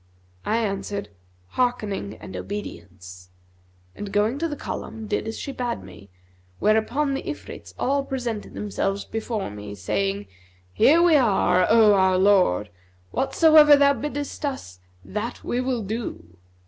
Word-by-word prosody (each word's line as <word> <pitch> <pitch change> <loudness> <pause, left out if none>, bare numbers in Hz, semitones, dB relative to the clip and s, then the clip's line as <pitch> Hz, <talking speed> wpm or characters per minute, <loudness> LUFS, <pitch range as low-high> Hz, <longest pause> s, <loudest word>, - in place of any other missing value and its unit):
I 220 - +2
answered, 200 -2 -3 0.4
'Hearkening 210 - -1
and 95 - -10
obedience' 90 -1 -8 0.7
and, 205 -1 -6
going 210 +6 +1
to 330 - 0
the 295 - -4
column, 225 -5 -6
did 210 +1 -2
as 225 - -4
she 280 - -5
bade 245 -3 -3
me, 100 -1 -13 0.5
where 215 +1 +3
upon 275 +6 0
the 270 - -2
Ifrits - - -8
all 275 +1 +1
presented 245 -6 -4
themselves 200 -1 -2
before 220 - -4
me 105 0 -8
saying, 100 +2 -2 0.5
'Here 310 - +5
are - - +5
we, 345 -3 +5
O 210 -2 +4
our 190 -1 +3
lord! 185 - +3 0.4
Whatsoever 305 - +6
thou 280 0 +5
biddest 290 +3 -5
us, 175 - -4 0.3
that 215 +4 -5
will 250 -1 -1
we 200 - -7
do.' 200 - -5
215 Hz, 140 wpm, -24 LUFS, 180-260 Hz, 0.7 s, Whatsoever